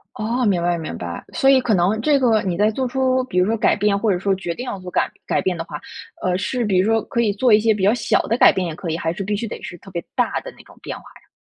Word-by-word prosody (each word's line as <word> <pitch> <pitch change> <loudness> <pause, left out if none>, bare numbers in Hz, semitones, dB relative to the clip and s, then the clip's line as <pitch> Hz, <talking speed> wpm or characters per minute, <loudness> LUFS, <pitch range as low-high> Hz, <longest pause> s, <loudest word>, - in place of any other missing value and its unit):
哦， 235 +4 -1
明 190 -5 +2
白， 175 0 +1
明 155 - -6
白。 85 -1 -6
所 270 - +2
以 265 -1 +6
可 235 -4 +1
能 190 +5 +2
这 290 +2 +3
个 230 -5 +3
你 180 -3 -2
在 210 +2 +3
做 255 +3 -2
出 260 0 +1
比 180 -8 -3
如 180 - +4
说 225 +1 +1
改 210 - +2
变 205 0 +2
或 215 0 +1
者 175 - 0
说 195 +1 +1
决 175 -3 -4
定 250 - -6
要 200 -6 -5
做 180 0 -8
改 - - +1 0.2
改 - - +1
变 185 -2 -1
的 165 - -3
话， 150 - -8 0.4
呃， 180 -1 +1
是 240 +4 -2
比 195 -4 +1
如 200 +4 +2
说 225 0 +3
可 235 - -2
以 215 -3 +2
做 230 +3 +2
一 210 - +6
些 225 0 +3
比 205 -2 -3
较 205 - +5
小 - - +1
的 230 - -1
改 - - +7
变 185 -2 -2
也 160 - -4
可 165 0 -5
以， 160 - -1
还 165 - -1
是 195 - -5
必 205 +1 -1
须 230 - -3
得 - - -7
是 175 - -7
特 195 - -14
别 170 -2 -4
大 - - +1
的 - - -9
那 - - -15
种 - - -18
变 - - -5
化 - - -13 0.2
呀？ - - -30
205 Hz, 345 characters per minute, -21 LUFS, 180-230 Hz, 0.4 s, 改